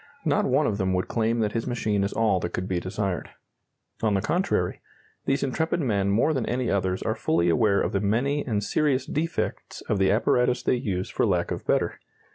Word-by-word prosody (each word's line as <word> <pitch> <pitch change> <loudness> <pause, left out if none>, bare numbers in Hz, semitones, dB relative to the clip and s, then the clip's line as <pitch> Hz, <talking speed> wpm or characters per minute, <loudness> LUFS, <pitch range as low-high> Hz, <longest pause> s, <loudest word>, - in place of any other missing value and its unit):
Not - - +2
one 140 +4 +2
of 105 -5 -1
them 95 -1 +1
would 90 0 0
claim 115 0 0
that 105 -1 0
his 115 +2 -2
machine 110 -5 0
is 100 - -1
all 110 -5 +2
that 85 - -4
could 90 - -3
be 90 -2 0
desired. 95 -1 -3 0.7
On 110 -2 +2
the 95 - +1
contrary, 155 - 0 0.4
these 135 0 +1
intrepid 160 +5 0
men 100 - +1
more 115 +10 +3
than 130 -6 -1
any 125 -1 -1
others 95 -2 0
are - - 0
fully 85 +2 +1
aware 100 +2 +3
of - - 0
the 100 - 0
many 125 +8 +1
and 105 -5 -1
serious 135 +2 +1
defects 165 +4 -3
of 105 - -1
the 95 -1 +3
apparatus 125 +4 +2
they - - +2
use 100 -7 -2
for - - +1
lack - - 0
of - - -5
better. - - +1
110 Hz, 210 wpm, -26 LUFS, 95-130 Hz, 0.7 s, more